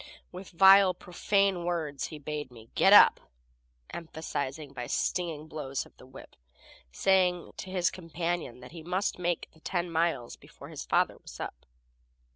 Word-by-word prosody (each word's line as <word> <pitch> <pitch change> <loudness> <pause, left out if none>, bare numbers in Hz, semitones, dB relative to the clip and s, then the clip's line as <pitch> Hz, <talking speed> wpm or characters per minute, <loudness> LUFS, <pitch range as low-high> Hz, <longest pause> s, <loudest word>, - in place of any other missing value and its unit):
With 185 +1 -9
vile, 190 +1 +7
profane 195 +1 0
words 160 -5 -2
he 155 - -9
bade 150 -1 -5
me 115 -2 -15
"Get - - +4
up," - - +8 0.7
emphasizing 155 -3 -5
by 125 -2 -6
stinging 165 -4 -2
blows 135 -4 -4
of - - -20
the 130 - -15
whip, 130 +1 -14 0.6
saying 180 - +2
to 190 - -7
his 180 -2 +1
companion 165 -7 -4
that 125 - -12
he 165 0 -9
must 180 +3 -2
make 175 -1 -2
the 160 - -22
ten 175 +1 -3
miles 165 -7 -1
before - - -14
his - - -7
father - - +1
was - - -12
up. - - -7
165 Hz, 155 wpm, -29 LUFS, 145-180 Hz, 0.7 s, up